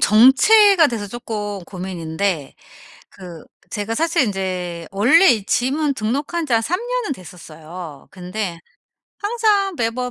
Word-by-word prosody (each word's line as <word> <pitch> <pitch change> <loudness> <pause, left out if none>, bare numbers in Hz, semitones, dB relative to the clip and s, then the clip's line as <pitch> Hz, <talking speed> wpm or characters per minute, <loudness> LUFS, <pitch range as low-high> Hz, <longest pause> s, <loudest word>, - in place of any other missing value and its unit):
정체가 325 - +6
돼서 225 -4 -4
쪼끔 205 -2 -5
고민인데 175 -3 -4 0.6
그 175 -4 -11 0.3
제가 210 +1 -3
사실 330 +2 +1
인제 185 -5 -4
원래 260 - +5
이 215 -4 -1
짐은 280 +6 0
등록한 280 +9 -2
지 260 - -2
한 225 - +3
3 345 - -2
년은 485 - -3
됐었어요. 165 - -11
근데 180 -1 -5 0.6
항상 415 -3 +1
매번 250 0 -2
220 Hz, 240 characters per minute, -20 LUFS, -, 0.6 s, 정체가